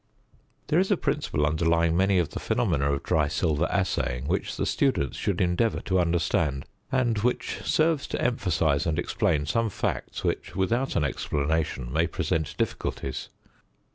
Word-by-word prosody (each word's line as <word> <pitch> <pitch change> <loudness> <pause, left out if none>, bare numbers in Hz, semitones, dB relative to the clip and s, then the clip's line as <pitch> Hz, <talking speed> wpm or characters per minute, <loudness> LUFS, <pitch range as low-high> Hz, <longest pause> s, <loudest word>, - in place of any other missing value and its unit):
There 160 - +4
is 190 - +1
a 200 - +3
principle 140 - 0
underlying 80 +2 +2
many 95 +2 +3
of 85 -4 +1
the - - -6
phenomena 70 0 +1
of 70 - -2
dry 75 -2 +2
silver 75 0 0
assaying 60 +2 -1
which - - -1
the - - 0
student 130 - +1
should - - -2
endeavour 90 +6 +1
to 95 -2 +1
understand; 85 -4 +1 0.3
and 120 -5 +1
which 125 +4 -1
serves 155 -2 +2
to - - -3
emphasise 85 -10 +1
and 80 -1 0
explain 85 -4 0
some 115 +8 +1
facts - - -3
which - - -2
without 115 +8 0
an 80 - +2
explanation 70 -2 -1
may 80 +2 +2
present 80 -3 -2
difficulties. 65 - -3
85 Hz, 155 wpm, -26 LUFS, 75-115 Hz, 0.3 s, There